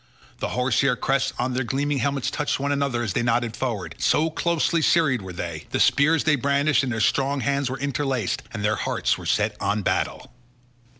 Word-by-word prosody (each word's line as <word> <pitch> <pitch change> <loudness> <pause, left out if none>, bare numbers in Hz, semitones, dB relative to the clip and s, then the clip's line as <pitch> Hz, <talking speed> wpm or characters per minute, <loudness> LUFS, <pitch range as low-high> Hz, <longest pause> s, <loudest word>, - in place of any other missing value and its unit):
The - - -2
horse 125 +1 +2
hair 140 -2 +2
crests 135 0 0
on 125 +1 -1
their 130 +1 0
gleaming 140 +3 -1
helmets 140 +1 -1
touched 150 -2 -1
one 140 +1 -1
another 140 -4 0
as 105 -6 -2
they - - 0
nodded 120 -1 0
forward, 120 -6 -3
so 160 +1 +2
closely 170 0 +1
serried 150 -7 +3
were 95 -1 -8
they; 85 -3 -6
the - - -2
spears 155 +3 +4
they 155 -1 +3
brandished 140 +2 +2
in 130 - -2
their 110 -2 -2
strong 135 +5 +1
hands 140 +2 0
were 130 - -4
interlaced, 135 -5 -1
and 105 -3 -3
their 105 0 +1
hearts - - 0
were - - -7
set - - +1
on 105 0 0
battle. - - -2
135 Hz, 200 wpm, -24 LUFS, 120-140 Hz, -, spears